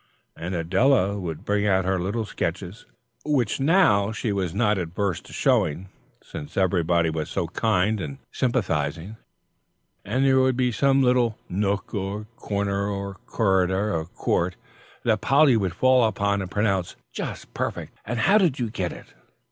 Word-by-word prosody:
And 90 Hz, +3 st, -4 dB
Adela 100 Hz, +4 st, +2 dB
would 85 Hz, -1 st, -6 dB
bring 105 Hz, 0 st, +1 dB
out 95 Hz, -2 st, +2 dB
her 95 Hz, 0 st, +1 dB
little 105 Hz, +5 st, -2 dB
sketches, 90 Hz, +1 st, -4 dB, 0.4 s
which 140 Hz, -8 st, 0 dB
now 135 Hz, -, +4 dB
she 110 Hz, 0 st, -2 dB
was 95 Hz, -4 st, -1 dB
not 105 Hz, 0 st, +1 dB
averse 90 Hz, +2 st, -2 dB
to -, -, -16 dB
showing, 85 Hz, +6 st, +1 dB, 0.3 s
since 75 Hz, 0 st, -9 dB
everybody 85 Hz, -3 st, +2 dB
was 80 Hz, -1 st, -3 dB
so 95 Hz, -, -1 dB
kind 105 Hz, +1 st, +1 dB
and 135 Hz, +8 st, -5 dB
sympathising, 95 Hz, -, -1 dB, 0.9 s
and 125 Hz, +7 st, 0 dB
there 130 Hz, -1 st, +4 dB
would 130 Hz, -1 st, +2 dB
be 125 Hz, -1 st, +2 dB
some 135 Hz, +2 st, +3 dB
little 125 Hz, -3 st, +2 dB
nook 100 Hz, +2 st, -2 dB
or 100 Hz, +1 st, -3 dB
corner 100 Hz, -1 st, -2 dB, 0.2 s
of 95 Hz, -2 st, -13 dB
corridor 95 Hz, -1 st, +1 dB
or 80 Hz, -1 st, -1 dB
court 90 Hz, 0 st, -1 dB, 0.5 s
that 110 Hz, -3 st, +1 dB
Polly 135 Hz, +2 st, +5 dB
would 95 Hz, -5 st, -1 dB
fall 130 Hz, -1 st, +4 dB
upon 100 Hz, -1 st, 0 dB
and 95 Hz, -, -5 dB
pronounce, 95 Hz, -3 st, 0 dB, 0.2 s
"Just -, -, -6 dB
perfect, -, -, -4 dB
and 115 Hz, +1 st, -3 dB
how 205 Hz, -, +5 dB
did 170 Hz, -9 st, +2 dB
you 120 Hz, -4 st, -2 dB
get 90 Hz, -5 st, -2 dB
it?" -, -, -12 dB
100 Hz, 155 wpm, -24 LUFS, 90-120 Hz, 0.9 s, Polly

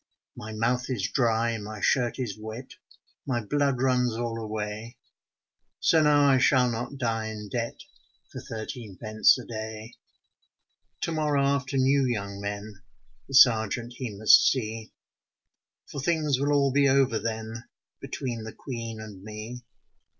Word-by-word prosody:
My 110 Hz, -, -8 dB
mouth 120 Hz, +4 st, 0 dB
is 100 Hz, -6 st, -2 dB
dry, 115 Hz, -2 st, +1 dB
my 105 Hz, +1 st, -7 dB
shirt 120 Hz, +2 st, +1 dB
is 120 Hz, -7 st, -3 dB
wet, 110 Hz, +4 st, -8 dB, 0.6 s
My 125 Hz, -3 st, 0 dB
blood 140 Hz, +1 st, +1 dB
runs 125 Hz, -3 st, +2 dB
all 115 Hz, -1 st, -3 dB
away, 110 Hz, +2 st, -5 dB, 0.8 s
So 160 Hz, -, +4 dB
now 145 Hz, -1 st, +5 dB
I 135 Hz, -2 st, +5 dB
shall 125 Hz, -1 st, +4 dB
not 120 Hz, +5 st, -4 dB
die 115 Hz, -3 st, -1 dB
in 105 Hz, -1 st, -7 dB
debt 115 Hz, 0 st, -3 dB, 0.5 s
For 130 Hz, -, -7 dB
thirteen 110 Hz, -4 st, -7 dB
pence 110 Hz, +1 st, +4 dB
a 125 Hz, -, -8 dB
day. 110 Hz, 0 st, -7 dB, 1.1 s
To -, -, -1 dB
morrow 150 Hz, -3 st, +1 dB
after 140 Hz, -1 st, 0 dB
new 135 Hz, +1 st, +3 dB
young 100 Hz, -5 st, -2 dB
men 100 Hz, 0 st, -6 dB, 0.5 s
The 135 Hz, -, -4 dB
sergeant 115 Hz, -1 st, +5 dB
he 125 Hz, -3 st, -4 dB
must 110 Hz, +1 st, +7 dB
see, 110 Hz, -3 st, -3 dB, 1.0 s
For 140 Hz, -, -4 dB
things 150 Hz, -3 st, +1 dB
will 145 Hz, +1 st, +1 dB
all 140 Hz, -2 st, +3 dB
be 140 Hz, +1 st, +4 dB
over 135 Hz, -4 st, +3 dB
then 110 Hz, +1 st, -5 dB, 0.3 s
Between 120 Hz, -4 st, -5 dB
the 110 Hz, -, -7 dB
Queen 115 Hz, -4 st, -6 dB
and 105 Hz, -4 st, -9 dB
me. 110 Hz, +4 st, -8 dB
120 Hz, 145 wpm, -27 LUFS, 110-130 Hz, 1.1 s, must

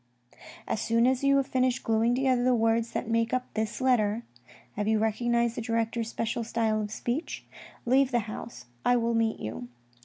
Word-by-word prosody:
" -, -, -17 dB, 0.2 s
As 215 Hz, -, -1 dB
soon 230 Hz, +1 st, +2 dB
as 260 Hz, +1 st, +2 dB
you 275 Hz, 0 st, +4 dB
have 275 Hz, -, +2 dB
finished 255 Hz, -2 st, 0 dB
glueing 225 Hz, +2 st, +2 dB
together 255 Hz, -2 st, +2 dB
the 250 Hz, 0 st, +3 dB
words 225 Hz, 0 st, +1 dB
that -, -, -2 dB
make 230 Hz, +1 st, +1 dB
up 250 Hz, 0 st, -4 dB
this 220 Hz, -1 st, -2 dB
letter 235 Hz, -4 st, +2 dB, 0.5 s
(have 205 Hz, 0 st, -2 dB
you 220 Hz, 0 st, +3 dB
recognised 235 Hz, +2 st, +1 dB
the -, -, -1 dB
director's 230 Hz, 0 st, -1 dB
special 230 Hz, +1 st, -2 dB
style 220 Hz, -1 st, 0 dB
of 210 Hz, -, -4 dB
speech) 245 Hz, +8 st, -4 dB, 0.4 s
leave 260 Hz, +2 st, +4 dB
the 240 Hz, -2 st, +1 dB
house, 215 Hz, -, -8 dB, 0.2 s
I 245 Hz, -, +4 dB
will 235 Hz, -1 st, +1 dB
meet 225 Hz, -1 st, +1 dB
you. 110 Hz, +3 st, -6 dB
230 Hz, 190 wpm, -28 LUFS, 220-245 Hz, 0.5 s, you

